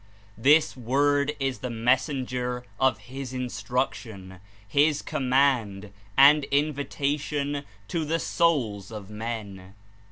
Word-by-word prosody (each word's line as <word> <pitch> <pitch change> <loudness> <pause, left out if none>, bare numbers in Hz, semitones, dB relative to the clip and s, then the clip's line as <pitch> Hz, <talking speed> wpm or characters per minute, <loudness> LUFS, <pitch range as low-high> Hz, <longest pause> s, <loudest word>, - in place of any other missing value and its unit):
This 145 +7 +4
Word 140 +4 +1
is 135 -4 -2
the 125 - -4
messenger 125 +1 0 0.2
of 130 -1 +3
his 130 0 -8
instruc 125 0 -2
tion, 95 -5 -11 0.3
his 145 +7 +3
command 125 -7 +1 0.2
and 145 +2 +7
invitation 145 0 -1 0.3
to 165 -2 -1
the 160 +2 0
souls 130 - 0
of 105 -2 -8
men. 105 -4 -6
130 Hz, 105 wpm, -26 LUFS, 115-145 Hz, 0.3 s, and